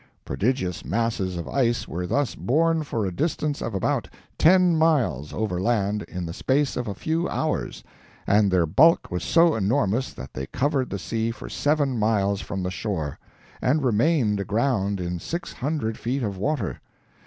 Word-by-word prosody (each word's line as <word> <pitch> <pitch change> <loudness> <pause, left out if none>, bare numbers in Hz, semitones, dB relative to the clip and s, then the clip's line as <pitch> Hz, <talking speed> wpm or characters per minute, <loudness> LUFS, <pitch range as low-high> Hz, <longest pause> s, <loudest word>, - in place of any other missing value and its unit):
Prodigious 95 - -1
masses 95 - -1
of 85 - -5
ice 120 -3 0
were 90 +2 -4
thus 140 +4 0
borne 165 +5 +1
for 115 -8 -2
a 95 - -2
distance 150 - -1
of 115 - -3
about 95 - 0 0.3
ten 180 0 +5
miles 125 - +2
over 100 -5 -2
land 105 -1 +1
in 90 -1 -5
the 80 - -5
space 140 +8 +1
of 125 -1 -3
a 100 - -3
few 165 - -1
hours; 155 - -2 0.4
and 100 0 +4
their 90 -2 +3
bulk 145 - +4
was 90 -1 -2
so 165 -1 +4
enormous 110 +3 +1
that 65 +1 -10
they 65 +1 -5
covered 135 -1 0
the 100 - -3
sea 115 +4 -2
for 115 - -7
seven 145 -4 +1
miles 100 -2 +1
from 95 -2 -4
the 90 - -2
shore, 90 -8 -3 0.4
and 145 +3 +2
remained 120 -2 +2
aground 100 -1 0
in 90 -1 -3
six 170 - -5
hundred 135 -5 -2
feet 125 +3 -2
of 100 -3 -2
water! 140 +8 -2
115 Hz, 170 wpm, -24 LUFS, 95-145 Hz, 0.4 s, ten